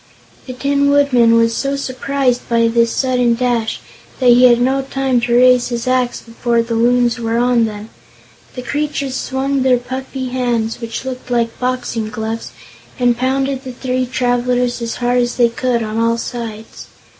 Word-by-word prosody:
The 255 - -5
Tin 280 +2 +1
Woodman 255 -5 +4
was 230 0 +2
so 275 0 -1
surprised 260 -1 -2
by 230 -1 +3
this 230 0 +2
sudden 250 -3 +1
dash 235 -2 -1 0.4
that 255 -2 +4
he 245 +1 +6
had 240 -1 +5
no 265 +2 +1
time 270 -2 -1
to 235 0 0
raise 250 0 +5
his 240 0 -4
axe 255 -1 0
before 235 0 -1
the 230 0 -4
Loons 240 +1 +2
were 230 0 -1
on 240 -1 +3
them. 215 0 -7 0.6
The 250 - -6
creatures 285 -1 -2
swung 270 +1 -1
their 255 -1 +3
puffy 260 +1 -5
hands, 240 -3 -2
which 230 +2 -5
looked 255 -1 -6
like 235 -2 -1
boxing 250 -3 -2
gloves, 220 +1 -5 0.5
and 245 -2 +2
pounded 265 +2 -1
the 255 -2 -7
three 255 0 -2
travelers 245 -1 0
as 230 -1 -3
hard 245 0 +1
as 240 0 -2
they 240 -1 +3
could, 235 0 -1
on 215 +1 -3
all 230 0 +1
sides. 225 -2 -7
245 Hz, 170 wpm, -17 LUFS, 235-255 Hz, 0.6 s, he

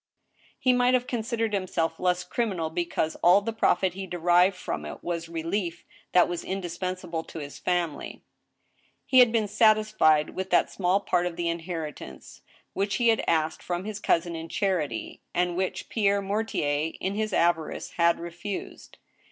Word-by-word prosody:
He 255 - +3
might 250 0 +4
have 250 -1 +1
considered 230 -2 -2
himself 165 -4 -1
less 180 0 +1
criminal 185 -10 -2
becatse 170 -2 -1
all 180 +3 +7
the 225 +3 -3
profit 190 -4 +2
he 190 +1 -6
derived 175 +2 +3
from 80 - -4
it 75 - -8
was 170 -1 -3
relief 170 +1 -3 0.3
that 180 - +5
was 175 -1 -4
indispensable 180 -2 -4
to - - -10
his 145 -2 -7
family. 175 -5 -2 0.8
He 260 - +5
had 245 -2 +7
been 225 -2 +1
satisfied 215 -8 +3
with 190 0 -4
that - - +3
small 190 +1 +1
part 180 -2 +1
of 175 - -5
the 170 0 -1
inheritance 165 - -6 0.3
which 200 +1 -1
he 235 -2 +3
had 225 - +2
asked 160 -1 +1
from 175 +1 -3
his 215 -1 -5
cousin 170 -3 +1
in 165 0 -6
charity, 165 - -2
and 180 0 +1
which 185 +1 -2
Pierre 200 -3 +2
Mortier, 175 -7 -1
in 190 - -2
his 215 +1 -2
avarice, 170 -3 0
had 170 0 +2
refused. 175 +4 -7
180 Hz, 160 wpm, -27 LUFS, 165-205 Hz, 0.8 s, all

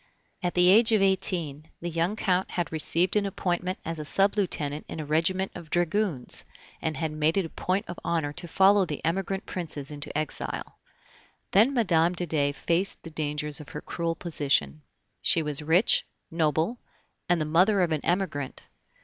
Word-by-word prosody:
At 175 -2 -2
the 180 0 +5
age 220 +4 +7
of 215 - +4
eighteen, 165 -6 +1
the 175 - -4
young 170 +5 0
Count 185 -3 0
had 175 -2 -3
received 165 +4 +2
an 205 -1 +2
appointment 180 -1 -2
as 165 -1 -3
sub 195 +1 +3
lieutenant 155 -7 -1
in - - -6
a 155 - -4
regiment 170 +6 0
of 170 -3 -10
dragoons, 175 - -1 0.4
and 155 -3 -2
had 160 0 -2
made 155 +3 +1
it 195 - +2
a - - -7
point 185 +5 -2
of 175 - -7
honor 160 -4 -1
to 175 - -7
follow 195 +4 +5
the 155 -4 -5
emigrant 190 +3 -1
Princes 155 -5 -5
into 145 0 -5
exile. 155 -2 -4 0.7
Then 225 +8 +5
Mme. 175 -7 +3
de 175 - -3
Dey 145 -3 +1
faced 170 +6 -1
the 165 - -9
dangers 150 -1 -2
of 150 - -11
her - - -6
cruel 165 -1 -3
position. 140 - 0 0.4
She 165 - +2
was 150 0 -1
rich, 165 +8 +4 0.3
noble, 165 - 0 0.5
and 175 -1 +3
the 155 - -1
mother 185 +6 +3
of 170 - 0
an 155 -2 0
Emigrant. 170 -7 -2
170 Hz, 175 wpm, -27 LUFS, 155-185 Hz, 0.7 s, age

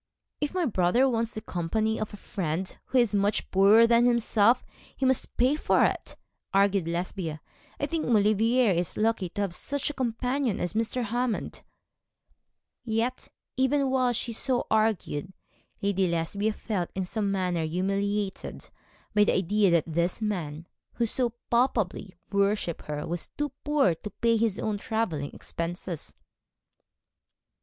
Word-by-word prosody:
'If 295 +4 -2
my 360 -2 +1
brother 220 - +3
wants 230 -2 -1
the 215 - -4
company 215 +4 -1
of 215 - -3
a 205 - -9
friend 185 -2 -3
who 260 - 0
is 235 -4 +3
much 205 +1 0
poorer 200 +4 +6
than 235 +1 +4
himself, 235 0 +3 0.3
he 265 - 0
must 260 -1 +1
pay 255 +4 +3
for 305 - +3
it,' - - -2 0.4
argued 195 -3 +3
Lesbia. 170 -2 -3 0.4
'I - - 0
think 330 -2 -2
Maulevrier 225 +1 +3
is 175 -1 -1
lucky 215 -4 +1
to 205 +4 -4
have 195 -4 -1
such 285 +9 -2
a - - -12
companion 250 -1 -1
as 175 - -2
Mr. 230 +3 -1
Hammond.' 240 +1 -2 1.2
Yet, 230 +1 -1 0.3
even 265 +1 +2
while 255 -2 +2
she 235 0 -2
so 250 +2 0
argued, 210 -6 0 0.5
Lady 195 -2 +2
Lesbia 180 +6 -1
felt 200 -6 -3
in 190 -1 -1
some 200 +1 -1
manner 180 -4 0
humiliated 195 +4 -2 0.4
by 210 0 +5
the - - +2
idea 200 +2 +2
that 170 -2 +3
this 170 +4 -1
man 170 -8 -3 0.3
who 235 - 0
so 235 +1 0 0.2
palpably 225 -6 +1 0.2
worshipped 200 -4 0
her 150 -1 -4
was 170 0 -3
too 295 0 -1
poor 290 - +3
to 165 +6 -8
pay 230 +2 +1
his 225 -3 +1
own 210 -2 -2
travelling 200 - -2
expenses. 170 -1 -5
210 Hz, 150 wpm, -27 LUFS, 185-235 Hz, 1.2 s, poorer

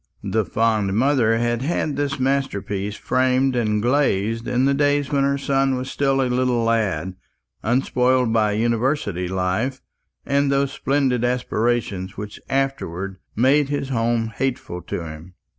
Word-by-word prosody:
The 110 -1 0
fond 110 -3 +1
mother 120 -2 +3
had 120 0 0
had 150 0 -1
this 140 -1 -2
masterpiece 105 -7 -1
framed 130 +2 +1
and 105 -3 0
glazed 115 -4 +1
in 125 +1 +1
the 140 - +3
days 145 0 +1
when 140 -1 +2
her 140 0 +1
son 135 -1 +1
was 130 +1 -4
still 135 -1 +1
a - - +1
little 125 -1 +1
lad, 100 -7 0 0.5
unspoiled 125 0 +2
by 105 -2 +2
University 115 - 0
life 95 +8 -1 0.5
and 140 0 +1
those 140 0 +1
splendid 135 -4 0
aspirations 120 -5 -1
which 105 0 -7
afterwards 100 -9 -2 0.2
made 135 +5 +3
his 145 -2 -2
home 115 -2 0
hateful 125 -9 -3
to 85 - -5
him. 80 +3 -10
125 Hz, 140 wpm, -22 LUFS, 105-135 Hz, 0.5 s, mother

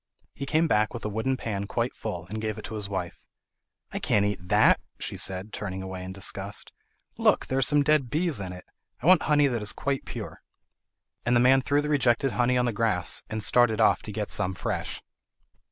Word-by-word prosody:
He 140 - -6
came 160 +2 +2
back 105 -4 +1
with 115 - -6
a - - -1
wooden 110 +5 -1
pan 100 -4 -3
quite 120 +3 -1
full, 90 -7 -5
and 110 +4 -5
gave 110 -1 -3
it 110 - -8
to - - -7
his 105 -2 -4
wife. 95 -3 -4 0.7
"I - - -3
can't 100 -1 +2
eat 105 -2 -1
that," 105 +3 +5 0.2
she - - -4
said, 95 +3 -2
turning 95 -2 -4
away 95 -1 -6
in 95 - -6
disgust. 100 +1 -4 0.5
"Look! - - +3
there 130 - -1
are - - +1
some 145 +2 +4
dead 145 -4 +2
bees 160 - 0
in 95 -2 -5
it! 90 0 -10 0.4
I - - -4
want 180 0 +7
honey 145 -1 +3
that 120 -5 0
is 105 - -1
quite 140 -1 -2
pure." - - -7 0.8
And 120 +1 +2
the - - +5
man 130 +2 +5
threw 145 +2 +1
the 150 - -3
rejected 135 -2 +2
honey 125 +1 +2
on 125 - +2
the 120 - 0
grass, 105 -5 +1
and 110 -1 -2
started 120 -2 +4
off 110 - +4
to 105 - -7
get 105 0 -3
some 95 -2 -1
fresh. - - -3
110 Hz, 220 wpm, -27 LUFS, 100-130 Hz, 0.8 s, want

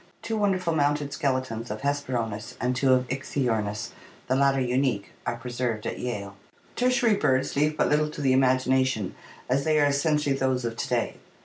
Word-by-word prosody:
Two 225 - -2
wonderful 190 -5 +1
mounted 145 -1 +1
skeletons 130 -6 -2
of 105 +1 -5
Hesperornis 125 -7 -2
and 125 0 0
two 130 +1 +3
of 130 -1 +3
Ichthyornis, 120 -6 -2 0.3
the 130 - +1
latter 135 0 +3
unique, 125 -5 0 0.2
are - - 0
preserved 120 -2 -3
at - - -3
Yale. 100 -5 -4 0.4
Tertiary 245 -2 +3
birds 130 -8 +1
leave 150 +2 +1
but - - +3
little 150 +1 +2
to 150 - -7
the 135 -2 +3
imagination, 130 -4 +2 0.3
as 135 +2 +1
they 155 0 +3
are 145 - +5
essentially 145 0 +1
those 130 -2 0
of 115 -1 -3
to - - -2
day. - - -1
130 Hz, 175 wpm, -26 LUFS, 125-145 Hz, 0.4 s, are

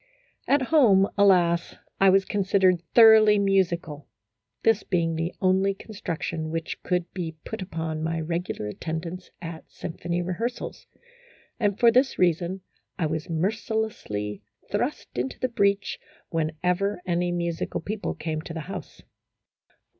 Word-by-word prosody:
At 285 -1 +3
home, 200 -10 +6
alas, 175 -4 +3 0.2
I 195 - +6
was 195 0 +4
considered 190 -3 +2
thoroughly 220 -2 +8
musi 195 -3 +3
cal; 150 -3 -10 0.6
this 225 -2 +4
being 170 -4 0
the 165 +2 -2
only 190 +1 +3
construction 170 -6 -4
which 165 0 -4
could 180 -1 -1
be 170 -3 -4
put 220 - -5
upon 160 -3 -4
my 165 +1 -1
regular 170 -6 -3
attendance 165 - -5
at 165 -1 -8
symphony 175 +1 -4
rehearsals; 225 +8 -4 0.7
and 205 -3 +1
for 235 -1 +6
this 255 +3 +3
reason 180 +1 +1 0.4
I 165 - 0
was 160 +1 -3
mercilessly 175 - -2 0.3
thrust - - -2
into 130 +2 -3
the 255 - 0
breach 200 -4 +1 0.3
whenever 175 +5 -1
any 175 0 0
musical 170 -1 -2
people 205 +5 -4
came 155 -1 -3
to 165 +1 -8
the 160 - -3
house. 185 +6 -8
180 Hz, 130 wpm, -26 LUFS, 165-200 Hz, 0.7 s, thoroughly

